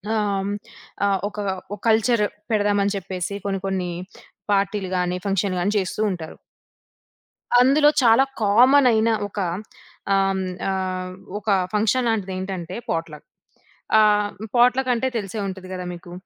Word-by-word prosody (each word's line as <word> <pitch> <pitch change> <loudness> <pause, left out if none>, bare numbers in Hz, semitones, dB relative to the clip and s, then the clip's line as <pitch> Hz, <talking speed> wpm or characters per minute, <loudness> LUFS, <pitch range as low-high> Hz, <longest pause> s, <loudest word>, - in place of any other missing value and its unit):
ఆహ్, 215 - +1 0.2
హ్మ్, 195 +1 -2 0.6
ఆహ్, 195 -1 +1
ఒక 210 - -10 0.4
ఓ - - -2
కల్చరు 225 0 +3 0.3
పెడదాం 205 -1 +2
అని 200 0 0
చెప్పేసి 185 0 -4
కొన్ని, 195 -1 -2
కొన్ని 185 -2 -2 0.6
పార్టీలు 195 -1 0
గాని, 180 0 0
ఫంక్షన్‌లు 195 -1 0
గాని 205 +4 0
చేస్తూ 195 +2 -2
ఉంటారు. 160 -3 -6 1.3
అందులో 285 +4 +5
చాలా 235 +3 +6 0.2
కామనయిన 230 +1 +5 0.2
ఒక 205 - -10 0.7
ఆహ్, 195 0 +3
హ్మ్, 190 - -2 0.3
ఆహ్, 185 -1 -3 0.3
ఒక 210 +1 -11 0.2
ఫంక్షన్ 220 +4 +1
లాంటిది 205 -4 -1
ఏంటంటే, 185 -3 -5
పాట్‌లక్. 165 -2 -4 0.7
ఆహ్, 210 -1 +4 0.3
పాట్‌లక్ 250 +2 +4
అంటే, 240 +2 0
తెలిసే 205 +1 -5
ఉంటది 185 -1 -7
కదా! 180 -1 -5
మీకు. 175 0 -12
200 Hz, 135 wpm, -22 LUFS, 185-220 Hz, 1.3 s, చాలా